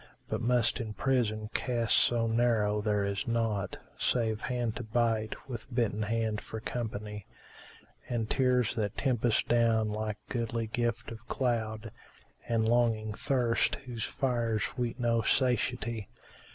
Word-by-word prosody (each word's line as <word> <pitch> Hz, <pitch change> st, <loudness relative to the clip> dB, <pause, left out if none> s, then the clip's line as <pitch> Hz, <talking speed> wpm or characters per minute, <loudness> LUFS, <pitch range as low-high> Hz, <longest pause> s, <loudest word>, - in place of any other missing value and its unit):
But -, -, -1 dB
must 120 Hz, 0 st, +2 dB
in 110 Hz, -3 st, -4 dB
prison 110 Hz, -5 st, 0 dB
cast 120 Hz, -3 st, +1 dB
so 120 Hz, -1 st, +4 dB
narrow 115 Hz, -2 st, +2 dB
there 105 Hz, -1 st, +1 dB
is 100 Hz, +5 st, -2 dB
naught 115 Hz, -4 st, 0 dB, 0.2 s
* -, -, -29 dB
Save 110 Hz, -3 st, 0 dB
hand 120 Hz, -3 st, -1 dB
to -, -, -4 dB
bite, 110 Hz, 0 st, 0 dB
with 125 Hz, 0 st, -7 dB
bitten 115 Hz, -4 st, 0 dB
hand 110 Hz, 0 st, 0 dB
for 110 Hz, -, -6 dB
company; 105 Hz, -3 st, -5 dB, 0.8 s
And 115 Hz, -3 st, -1 dB
tears 125 Hz, -3 st, +2 dB
that 105 Hz, -3 st, -2 dB
tempest 120 Hz, -4 st, +2 dB
down 115 Hz, -2 st, +3 dB
like 105 Hz, 0 st, -2 dB
goodly 115 Hz, -1 st, -2 dB
gift 120 Hz, +1 st, -2 dB
of 115 Hz, +1 st, -10 dB
cloud, 115 Hz, -3 st, -1 dB, 0.3 s
* -, -, -28 dB
And 115 Hz, -1 st, +2 dB
longing 115 Hz, -2 st, +2 dB
thirst 120 Hz, 0 st, +1 dB
whose 120 Hz, -3 st, -4 dB
fires 115 Hz, -2 st, -1 dB
weet 125 Hz, -1 st, -2 dB
no 115 Hz, -1 st, +2 dB
satiety. 115 Hz, -3 st, +1 dB
115 Hz, 140 wpm, -30 LUFS, 110-120 Hz, 0.8 s, so